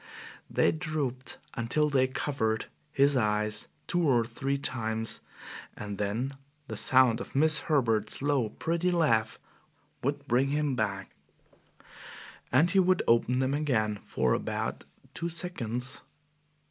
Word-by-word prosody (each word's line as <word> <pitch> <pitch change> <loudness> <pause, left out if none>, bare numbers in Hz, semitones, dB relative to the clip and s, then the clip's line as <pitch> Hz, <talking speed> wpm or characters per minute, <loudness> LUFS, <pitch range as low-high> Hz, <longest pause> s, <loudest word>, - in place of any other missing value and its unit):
They - - +3
drooped 150 -6 -3 0.2
until 130 +6 +1
they 130 -2 +3
covered 115 -5 -1 0.3
his 140 0 +3
eyes 105 -2 0 0.2
two 175 - 0
or 125 -8 +3
three 135 +4 -2
times, 115 -4 -1 0.6
and 105 -1 -6
then 110 +6 -1 0.4
the - - -5
sound 130 -3 +4
of - - -9
Miss 155 +2 +5
Herbert's 115 -8 +1
low, 135 -5 +1
pretty 170 +9 -1
laugh 140 -11 +2 0.6
would - - -2
bring 125 +3 +3
him 145 -1 0
back, 100 -4 -2 1.4
and 155 +8 +4
he 195 - +4
would 185 0 +3
open 120 +2 +3
them 130 +1 +1
again 110 -8 0
for - - 0
about - - -3 0.3
two 170 +2 -3
seconds. 130 - -2
130 Hz, 125 wpm, -29 LUFS, 110-150 Hz, 1.4 s, Miss